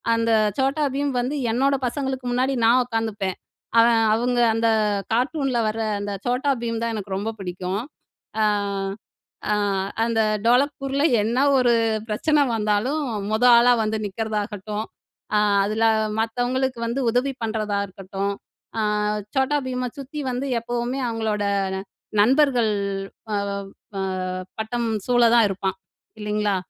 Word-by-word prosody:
அந்த 230 Hz, 0 st, +1 dB, 0.3 s
Chhota 275 Hz, +3 st, +1 dB
Bheem 285 Hz, 0 st, 0 dB
வந்து 275 Hz, +4 st, -2 dB, 0.2 s
என்னோட 275 Hz, +3 st, +2 dB
பசங்களுக்கு 265 Hz, -1 st, -3 dB
முன்னாடி, 260 Hz, +2 st, +1 dB
நான் 250 Hz, +2 st, +5 dB
உட்காந்துப்பேன்! 220 Hz, -5 st, -2 dB, 0.4 s
அவன் 230 Hz, 0 st, +5 dB
அவுங்க 245 Hz, +1 st, 0 dB, 0.2 s
அந்த 230 Hz, 0 st, +2 dB, 0.5 s
கார்ட்டூன்ல 260 Hz, 0 st, 0 dB
வர 220 Hz, +1 st, -4 dB, 0.2 s
அந்த 205 Hz, 0 st, -3 dB
Chhota 250 Hz, +3 st, +1 dB
Bheem 230 Hz, -1 st, -1 dB
தான் 230 Hz, -1 st, -1 dB
எனக்கு 200 Hz, -2 st, -4 dB
ரொம்ப 205 Hz, +3 st, -2 dB
பிடிக்கும். 185 Hz, +2 st, -3 dB, 0.6 s
அ -, -, +4 dB, 1.1 s
அ 210 Hz, -, +3 dB, 0.5 s
அந்த 230 Hz, -1 st, 0 dB, 0.3 s
டோலக்பூர்ல 275 Hz, +3 st, +2 dB, 0.2 s
என்ன 230 Hz, +4 st, 0 dB, 0.2 s
ஒரு 245 Hz, -2 st, +4 dB, 0.4 s
பிரச்சனை 300 Hz, +8 st, +2 dB
வந்தாலும், 215 Hz, +8 st, 0 dB, 0.3 s
மொத 220 Hz, +3 st, +1 dB
ஆளா 245 Hz, +1 st, +6 dB
வந்து 215 Hz, 0 st, -1 dB
நிக்கறதாகட்டும், 210 Hz, 0 st, -3 dB, 0.5 s
அ -, -, +5 dB, 0.2 s
அதுல 215 Hz, +3 st, +1 dB, 0.3 s
மத்தவங்களுக்கு 245 Hz, +3 st, -1 dB
வந்து 235 Hz, +4 st, -1 dB
உதவி 250 Hz, +4 st, +1 dB
பண்ணுறதா 215 Hz, -2 st, -1 dB
இருக்கட்டும், 195 Hz, +1 st, -4 dB, 0.5 s
அ -, -, +2 dB, 0.5 s
Chhota 270 Hz, +2 st, +2 dB
Bheemஅ 250 Hz, -1 st, -2 dB
சுத்தி 290 Hz, +2 st, -6 dB
வந்து 255 Hz, +3 st, -3 dB
எப்பவுமே 240 Hz, +3 st, -2 dB
அவங்களோட 220 Hz, -2 st, -1 dB, 0.8 s
நண்பர்கள் 250 Hz, -2 st, +4 dB, 0.6 s
வவவ் 200 Hz, -1 st, -2 dB, 0.3 s
வ 195 Hz, -, -1 dB, 0.6 s
வட்டம் 230 Hz, +1 st, -2 dB, 0.2 s
சூழ 245 Hz, -1 st, +3 dB
தான் 230 Hz, -3 st, +6 dB
இருப்பான் 190 Hz, 0 st, -2 dB, 0.4 s
இல்லைங்களா? 210 Hz, -1 st, 0 dB
230 Hz, 125 wpm, -23 LUFS, 210-260 Hz, 1.1 s, ஆளா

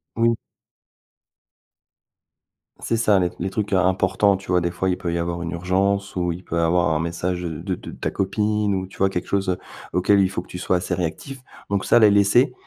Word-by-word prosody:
Oui. 115 Hz, +1 st, +3 dB, 2.5 s
C'est 115 Hz, -, -1 dB
ça. 105 Hz, -4 st, +3 dB
Les 90 Hz, -1 st, +1 dB
les 95 Hz, +3 st, -2 dB
trucs 105 Hz, 0 st, -3 dB
im 95 Hz, -1 st, +3 dB
importants, 95 Hz, +1 st, +2 dB
tu 95 Hz, -, -14 dB
vois, 90 Hz, -, +4 dB
des 85 Hz, -, -1 dB
fois 95 Hz, +2 st, -1 dB
il 90 Hz, -, 0 dB
peut 85 Hz, -1 st, -3 dB
y -, -, 0 dB
avoir 85 Hz, 0 st, -3 dB
une 85 Hz, -, -4 dB
urgence 95 Hz, +3 st, 0 dB
ou 90 Hz, -1 st, 0 dB
il 85 Hz, +2 st, -7 dB
peut 85 Hz, -, -5 dB
y -, -, +2 dB
avoir 85 Hz, +1 st, +2 dB
un 80 Hz, -1 st, +1 dB
message 85 Hz, +2 st, -2 dB
de 85 Hz, +3 st, -3 dB
de -, -, -10 dB
ta -, -, -3 dB
copine 105 Hz, +1 st, 0 dB
ou 95 Hz, -1 st, -2 dB
tu -, -, -16 dB
vois 95 Hz, 0 st, +3 dB
quelque 90 Hz, -, -4 dB
chose, 100 Hz, -1 st, 0 dB
heu, 90 Hz, -, 0 dB, 0.4 s
auquel 100 Hz, +3 st, +3 dB
il 95 Hz, -1 st, +3 dB
faut 95 Hz, -, -3 dB
que 90 Hz, -, -18 dB
tu -, -, -7 dB
sois 90 Hz, 0 st, +1 dB
assez 90 Hz, 0 st, -2 dB
réactif. 90 Hz, -, -4 dB, 0.3 s
Donc, 100 Hz, -1 st, -1 dB
ça -, -, +5 dB
les 105 Hz, -2 st, +7 dB
laisser, 100 Hz, +6 st, +4 dB
95 Hz, 225 wpm, -22 LUFS, 90-100 Hz, 2.5 s, les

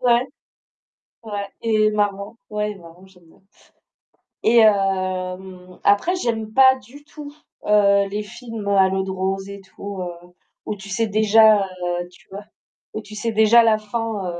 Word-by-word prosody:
Ouais. 245 Hz, 0 st, +2 dB, 1.0 s
Ouais 205 Hz, -2 st, -5 dB
il 220 Hz, -2 st, +1 dB
est 215 Hz, -, +3 dB
marrant. 205 Hz, +1 st, -2 dB
Ouais 210 Hz, 0 st, -2 dB
il 205 Hz, -, -10 dB
est -, -, -17 dB
marrant 170 Hz, +2 st, -15 dB
j'aime 180 Hz, -2 st, -22 dB
bien 160 Hz, -, -24 dB, 1.0 s
et 235 Hz, +1 st, +4 dB
hem 185 Hz, -3 st, -1 dB
après 205 Hz, -, +2 dB
j'aime 225 Hz, -9 st, -3 dB
pas 260 Hz, 0 st, +6 dB
du 265 Hz, +4 st, -16 dB
tout, 295 Hz, -1 st, -11 dB, 0.4 s
heu, 200 Hz, -1 st, +3 dB
les 205 Hz, +2 st, -4 dB
films, 225 Hz, -1 st, -8 dB
heu, -, -, +1 dB
à 190 Hz, -1 st, +5 dB
l'eau 190 Hz, 0 st, -1 dB
de 190 Hz, -, -5 dB
rose 190 Hz, +1 st, -3 dB
et 200 Hz, 0 st, -9 dB
tout, 195 Hz, 0 st, -9 dB
heu, 175 Hz, 0 st, -9 dB, 0.3 s
où 215 Hz, -, -4 dB
tu 195 Hz, 0 st, -12 dB
sais 225 Hz, +4 st, -1 dB
déjà, 215 Hz, +1 st, +5 dB
heu 175 Hz, -2 st, -4 dB
tu -, -, -22 dB
vois 200 Hz, +2 st, -9 dB, 0.5 s
où 215 Hz, -, -5 dB
tu 210 Hz, 0 st, -13 dB
sais 225 Hz, +2 st, -3 dB
déjà 220 Hz, +2 st, +5 dB
la 220 Hz, -2 st, +3 dB
fin, 215 Hz, -2 st, -4 dB
205 Hz, 175 wpm, -21 LUFS, 190-220 Hz, 1.0 s, pas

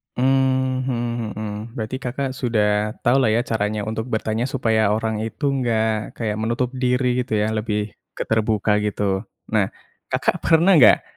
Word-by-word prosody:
Mmm, 130 Hz, 0 st, +1 dB
mhm 120 Hz, -2 st, -2 dB
mhm. 110 Hz, 0 st, -4 dB, 0.3 s
Berarti 110 Hz, +1 st, -4 dB
Kakak 130 Hz, +1 st, -3 dB
sudah 105 Hz, -4 st, 0 dB
tahulah 130 Hz, -1 st, +4 dB
ya 120 Hz, -, +2 dB
caranya 105 Hz, -2 st, -1 dB
untuk 110 Hz, +2 st, -3 dB
bertanya 110 Hz, +1 st, -1 dB
supaya 115 Hz, -6 st, +1 dB
orang 110 Hz, -1 st, -2 dB
itu 125 Hz, +6 st, -2 dB
enggak 110 Hz, -5 st, 0 dB
kayak 110 Hz, -2 st, -2 dB
menutup 120 Hz, +3 st, -1 dB
diri 125 Hz, -1 st, +1 dB
gitu 125 Hz, -3 st, -1 dB
ya, 105 Hz, +1 st, +1 dB
lebih 105 Hz, -1 st, -2 dB, 0.2 s
ke -, -, -2 dB
terbuka 110 Hz, -1 st, +1 dB
gitu. 100 Hz, -1 st, -1 dB, 0.2 s
Nah, 105 Hz, -3 st, +2 dB, 0.4 s
Kakak -, -, 0 dB
pernah 165 Hz, +4 st, +4 dB
enggak, 120 Hz, -, +7 dB
115 Hz, 150 wpm, -22 LUFS, 110-125 Hz, 0.4 s, enggak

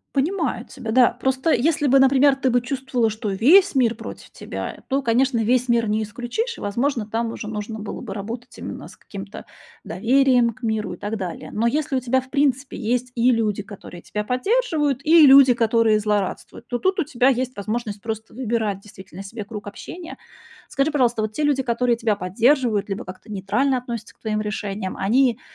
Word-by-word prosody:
Понимаю 290 Hz, -4 st, -1 dB
тебя, 250 Hz, -5 st, -7 dB
да. 245 Hz, +1 st, +5 dB
Просто 265 Hz, +5 st, 0 dB
если 295 Hz, +4 st, +2 dB
бы, 270 Hz, +1 st, +5 dB
например, 270 Hz, +1 st, +5 dB
ты 270 Hz, -1 st, 0 dB
бы 245 Hz, 0 st, +3 dB
чувствовала, 255 Hz, -2 st, -1 dB
что 215 Hz, 0 st, -4 dB
весь 300 Hz, -, +5 dB
мир 235 Hz, -3 st, +3 dB
против -, -, -9 dB
тебя, -, -, -7 dB
то, 275 Hz, +1 st, +1 dB
конечно, 255 Hz, +1 st, +2 dB
весь 245 Hz, +3 st, +1 dB
мир 235 Hz, -1 st, +2 dB
не 215 Hz, +1 st, 0 dB
исключишь, 245 Hz, -, -4 dB
и, -, -, -11 dB
возможно, 235 Hz, +3 st, -1 dB
там 230 Hz, +1 st, -1 dB
уже 215 Hz, -, -7 dB
нужно 215 Hz, 0 st, -5 dB
было 210 Hz, -, -6 dB
бы 220 Hz, -6 st, -6 dB
работать 225 Hz, +5 st, -7 dB
именно -, -, -7 dB
с -, -, -16 dB
каким-то -, -, -9 dB, 0.4 s
доверием 255 Hz, 0 st, +3 dB
к 255 Hz, -, -23 dB
миру 215 Hz, -4 st, -1 dB
и -, -, -19 dB
так 205 Hz, +4 st, -4 dB
далее. 185 Hz, -5 st, -6 dB
Но 225 Hz, -, 0 dB
если 295 Hz, +4 st, 0 dB
у 260 Hz, -, 0 dB
тебя 255 Hz, +1 st, +1 dB
в 260 Hz, 0 st, -11 dB
принципе 275 Hz, -1 st, 0 dB
есть 250 Hz, +2 st, -2 dB
и 240 Hz, +1 st, +4 dB
люди, 215 Hz, -4 st, 0 dB
которые 190 Hz, -3 st, -11 dB
тебя 210 Hz, +3 st, -4 dB
поддерживают, 295 Hz, -, 0 dB
и 320 Hz, 0 st, +7 dB
люди, 270 Hz, -2 st, +8 dB
которые 230 Hz, -2 st, +3 dB
злорадствуют, 210 Hz, +2 st, -3 dB
то 245 Hz, -, -2 dB
тут 375 Hz, +8 st, 0 dB
у -, -, +3 dB
тебя 260 Hz, -2 st, +2 dB
есть 255 Hz, 0 st, -1 dB
возможность 210 Hz, 0 st, -4 dB
просто 220 Hz, 0 st, -6 dB
выбирать 220 Hz, -5 st, -2 dB
действительно 195 Hz, -2 st, -11 dB
себе 210 Hz, +1 st, -7 dB
круг 205 Hz, -1 st, -8 dB
общения. 335 Hz, -, -9 dB, 0.5 s
Скажи, 275 Hz, +3 st, 0 dB
пожалуйста, 245 Hz, -6 st, +1 dB
вот 215 Hz, 0 st, -2 dB
те 265 Hz, +8 st, -3 dB
люди, 285 Hz, -2 st, +2 dB
которые 240 Hz, 0 st, +1 dB
тебя 225 Hz, -3 st, 0 dB
поддерживают 225 Hz, +2 st, +1 dB
либо 200 Hz, +5 st, -4 dB
как-то 185 Hz, +4 st, -11 dB
нейтрально 230 Hz, +8 st, 0 dB
относятся 235 Hz, -3 st, -6 dB
к -, -, -42 dB
твоим 215 Hz, -1 st, -2 dB
решениям, 205 Hz, -2 st, -4 dB
они, 240 Hz, +4 st, +2 dB
235 Hz, 195 wpm, -22 LUFS, 215-265 Hz, 0.5 s, люди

